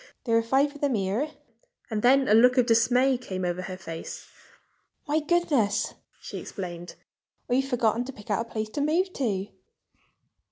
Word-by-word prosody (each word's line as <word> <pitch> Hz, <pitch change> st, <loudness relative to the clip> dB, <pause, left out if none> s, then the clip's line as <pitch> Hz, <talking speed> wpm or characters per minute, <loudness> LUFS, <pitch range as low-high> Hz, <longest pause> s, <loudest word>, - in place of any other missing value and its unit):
"There 230 Hz, -2 st, +1 dB
are 230 Hz, -, +5 dB
five 270 Hz, +5 st, +2 dB
of 290 Hz, -, -13 dB
them 280 Hz, -4 st, +1 dB
here." 205 Hz, +9 st, -1 dB, 0.6 s
And 215 Hz, -1 st, -1 dB
then, 265 Hz, +3 st, +4 dB
a -, -, +4 dB
look 250 Hz, +3 st, +6 dB
of 250 Hz, -, +5 dB
dismay 245 Hz, +3 st, +3 dB
came 185 Hz, -7 st, -4 dB
over 175 Hz, +1 st, -2 dB
her 185 Hz, 0 st, -6 dB
face. 165 Hz, -3 st, -8 dB, 0.8 s
"My 300 Hz, +2 st, +2 dB
goodness!" 295 Hz, -, +1 dB, 0.3 s
she -, -, -7 dB
exclaimed. 175 Hz, -3 st, -7 dB, 0.5 s
"I've 260 Hz, +2 st, +2 dB
forgotten 240 Hz, -3 st, +1 dB
to 270 Hz, -, -6 dB
pick 210 Hz, -4 st, -10 dB
out 205 Hz, -, +1 dB
a 230 Hz, -, -17 dB
place 215 Hz, -1 st, -3 dB
to 285 Hz, -, -3 dB
move 350 Hz, +6 st, +1 dB
to!" 205 Hz, -7 st, -2 dB
235 Hz, 170 wpm, -26 LUFS, 205-270 Hz, 0.8 s, look